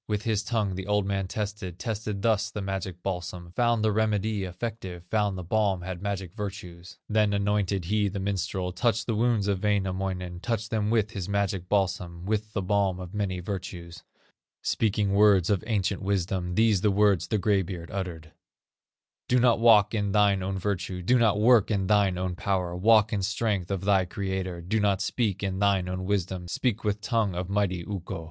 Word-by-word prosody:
With 105 Hz, -1 st, -1 dB
his 110 Hz, -2 st, +1 dB
tongue 110 Hz, -3 st, -1 dB
the 95 Hz, +1 st, -5 dB
old 105 Hz, -1 st, +1 dB
man 100 Hz, -1 st, -1 dB
tested, 100 Hz, -3 st, -4 dB
Tested 105 Hz, +1 st, -4 dB
thus 110 Hz, -2 st, +2 dB
the 105 Hz, -, -6 dB
magic 95 Hz, -2 st, -4 dB
balsam, 90 Hz, -2 st, -4 dB
Found 120 Hz, +2 st, +1 dB
the 110 Hz, -, +3 dB
remedy 105 Hz, -1 st, 0 dB
effective, 90 Hz, -2 st, -6 dB
Found 105 Hz, -3 st, +1 dB
the 90 Hz, -, -5 dB
balm 95 Hz, 0 st, +1 dB
had 90 Hz, -1 st, -5 dB
magic 95 Hz, -3 st, -4 dB
virtues; 95 Hz, -4 st, -7 dB
Then 105 Hz, -1 st, +2 dB
anointed 100 Hz, -2 st, 0 dB
he 105 Hz, +3 st, +1 dB
the 100 Hz, 0 st, -4 dB
minstrel, 95 Hz, -1 st, -2 dB
Touched 115 Hz, +3 st, 0 dB
the 115 Hz, -, -1 dB
wounds 110 Hz, -2 st, +1 dB
of 100 Hz, -2 st, 0 dB
Wainamoinen, 95 Hz, -3 st, -1 dB
Touched 110 Hz, +2 st, -3 dB
them 105 Hz, -2 st, 0 dB
with 110 Hz, -2 st, +1 dB
his 95 Hz, -3 st, -5 dB
magic 100 Hz, -3 st, -1 dB
balsam, 90 Hz, -3 st, -1 dB
With 105 Hz, +1 st, -2 dB
the 100 Hz, -, -1 dB
balm 95 Hz, -1 st, +1 dB
of 90 Hz, +1 st, -8 dB
many 95 Hz, -3 st, -2 dB
virtues; 90 Hz, -3 st, -6 dB, 0.6 s
Speaking 105 Hz, -2 st, +1 dB
words 100 Hz, -3 st, +5 dB
of 100 Hz, -, +1 dB
ancient 100 Hz, -3 st, 0 dB
wisdom, 95 Hz, -2 st, -1 dB
These 110 Hz, -3 st, +3 dB
the 105 Hz, -, +3 dB
words 100 Hz, -3 st, +3 dB
the 110 Hz, -, 0 dB
gray 100 Hz, 0 st, +2 dB
beard 85 Hz, -2 st, -7 dB
uttered: 85 Hz, -5 st, -5 dB, 1.0 s
"Do 125 Hz, -, +3 dB
not 120 Hz, -2 st, +4 dB
walk 110 Hz, -3 st, +6 dB
in 100 Hz, -3 st, -1 dB
thine 100 Hz, -2 st, +3 dB
own 95 Hz, +1 st, -2 dB
virtue, 95 Hz, -1 st, -3 dB
Do 125 Hz, +7 st, +3 dB
not 110 Hz, -3 st, +3 dB
work 115 Hz, -1 st, +5 dB
in 100 Hz, -3 st, 0 dB
thine 100 Hz, -2 st, +3 dB
own 90 Hz, -1 st, -2 dB
power, 90 Hz, -2 st, -1 dB
Walk 110 Hz, +3 st, +4 dB
in 100 Hz, -, 0 dB
strength 100 Hz, -2 st, -1 dB
of 95 Hz, -1 st, -3 dB
thy 100 Hz, -2 st, +3 dB
Creator; 95 Hz, -1 st, -4 dB
Do 95 Hz, +6 st, -1 dB
not 100 Hz, -2 st, +2 dB
speak 105 Hz, -1 st, -1 dB
in 95 Hz, -1 st, -2 dB
thine 100 Hz, -2 st, +2 dB
own 90 Hz, 0 st, -4 dB
wisdom, 95 Hz, -2 st, -2 dB
Speak 115 Hz, +4 st, -1 dB
with 105 Hz, -1 st, -1 dB
tongue 105 Hz, -3 st, 0 dB
of 90 Hz, +1 st, -3 dB
mighty 95 Hz, -4 st, 0 dB
Ukko. 95 Hz, -5 st, -5 dB
100 Hz, 190 wpm, -27 LUFS, 90-105 Hz, 1.0 s, walk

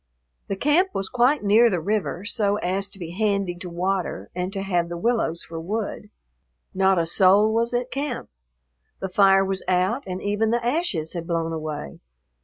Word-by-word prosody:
The 195 Hz, -, -2 dB
camp 330 Hz, -, +2 dB
was 195 Hz, 0 st, -2 dB
quite 250 Hz, +3 st, +2 dB
near 220 Hz, +4 st, +5 dB
the 180 Hz, -5 st, 0 dB
river 200 Hz, +1 st, -2 dB
so 205 Hz, -1 st, +1 dB
as 195 Hz, 0 st, -1 dB
to 200 Hz, -, -8 dB
be 170 Hz, -3 st, -7 dB
handy 200 Hz, -1 st, 0 dB
to 180 Hz, +1 st, -7 dB
water 175 Hz, -, -2 dB
and 180 Hz, +1 st, -3 dB
to 195 Hz, -1 st, -4 dB
have 175 Hz, -3 st, 0 dB
the 170 Hz, -, -4 dB
willows 215 Hz, -5 st, 0 dB
for 165 Hz, 0 st, -7 dB
wood. 210 Hz, +3 st, -4 dB, 0.6 s
Not 190 Hz, 0 st, +3 dB
a 170 Hz, -, +2 dB
soul 195 Hz, +5 st, +4 dB
was 230 Hz, +1 st, +1 dB
at 245 Hz, +1 st, -2 dB
camp. 275 Hz, -, -4 dB, 0.7 s
The 190 Hz, -, -4 dB
fire 195 Hz, 0 st, +5 dB
was 190 Hz, 0 st, -2 dB
out, 185 Hz, +8 st, +1 dB
and 185 Hz, 0 st, -4 dB
even 205 Hz, +3 st, 0 dB
the 235 Hz, +1 st, 0 dB
ashes 240 Hz, -, -1 dB
had 170 Hz, -2 st, -5 dB
blown 165 Hz, -1 st, -1 dB
away. 155 Hz, -, -5 dB
195 Hz, 185 wpm, -24 LUFS, 175-220 Hz, 0.7 s, near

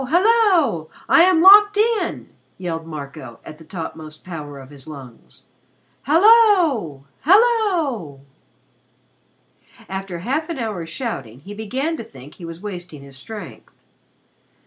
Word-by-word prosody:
Hallo! 350 Hz, -, +2 dB, 0.2 s
I -, -, +5 dB
am 365 Hz, -3 st, +3 dB
locked 415 Hz, +2 st, +8 dB
in!" 445 Hz, +1 st, 0 dB, 0.3 s
yelled 165 Hz, -3 st, -5 dB
Marco, 140 Hz, -6 st, -9 dB
at 155 Hz, -, -11 dB
the -, -, -13 dB
topmost 160 Hz, -2 st, -9 dB
power 150 Hz, -5 st, -8 dB
of 135 Hz, 0 st, -13 dB
his 140 Hz, -1 st, -14 dB
lungs. 135 Hz, -6 st, -13 dB, 0.6 s
"Hallo! 330 Hz, -, +4 dB
Hallo!" 345 Hz, -, +1 dB, 1.7 s
After 190 Hz, -2 st, -6 dB
half 275 Hz, -, -3 dB
an 335 Hz, -, -4 dB
hour's 210 Hz, -9 st, -5 dB
shouting, 135 Hz, -, -6 dB
he 200 Hz, +7 st, -10 dB
began 260 Hz, +10 st, -3 dB
to -, -, -6 dB
think 140 Hz, -, -14 dB
that -, -, -22 dB
he 170 Hz, -, -8 dB
was 165 Hz, +1 st, -9 dB
wasting 175 Hz, -8 st, -8 dB
his 140 Hz, -1 st, -13 dB
strength. 210 Hz, +10 st, -10 dB
195 Hz, 125 wpm, -20 LUFS, -, 1.7 s, locked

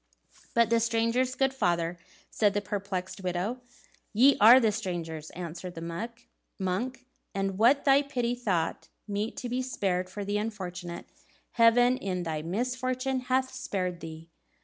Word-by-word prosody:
"But 235 Hz, -1 st, +4 dB
the 230 Hz, -, +5 dB
strangers, 230 Hz, +3 st, +1 dB
good 270 Hz, 0 st, +1 dB
father?" 175 Hz, -7 st, 0 dB, 0.3 s
said 205 Hz, -2 st, +2 dB
the -, -, +3 dB
perplexed 195 Hz, -1 st, -4 dB
widow. 185 Hz, +7 st, -2 dB, 0.5 s
"Ye 260 Hz, +6 st, +6 dB
are 235 Hz, +5 st, +10 dB
the 225 Hz, -4 st, +3 dB
strangers," 170 Hz, -7 st, -4 dB
answered 175 Hz, +1 st, -6 dB
the 170 Hz, +7 st, -4 dB, 0.5 s
monk; 240 Hz, +8 st, -2 dB, 0.3 s
"and 195 Hz, 0 st, -1 dB
what 260 Hz, +5 st, +5 dB
thy 275 Hz, 0 st, +6 dB
pity 245 Hz, -4 st, -1 dB
thought 190 Hz, -10 st, -1 dB, 0.2 s
meet 205 Hz, +2 st, -3 dB
to 245 Hz, -, -4 dB
be 250 Hz, +2 st, -1 dB
spared 190 Hz, -8 st, -1 dB
for 200 Hz, +2 st, -5 dB
the 205 Hz, +1 st, 0 dB
unfortunate, 180 Hz, -5 st, -5 dB, 0.5 s
Heaven 245 Hz, +2 st, +5 dB
in 185 Hz, -4 st, -3 dB
thy 160 Hz, -2 st, -3 dB
misfortune 255 Hz, -, -1 dB
hath 260 Hz, +1 st, 0 dB
spared 185 Hz, -9 st, -3 dB
to 165 Hz, -, -6 dB
thee." 160 Hz, +1 st, -10 dB
210 Hz, 150 wpm, -29 LUFS, 180-250 Hz, 0.5 s, are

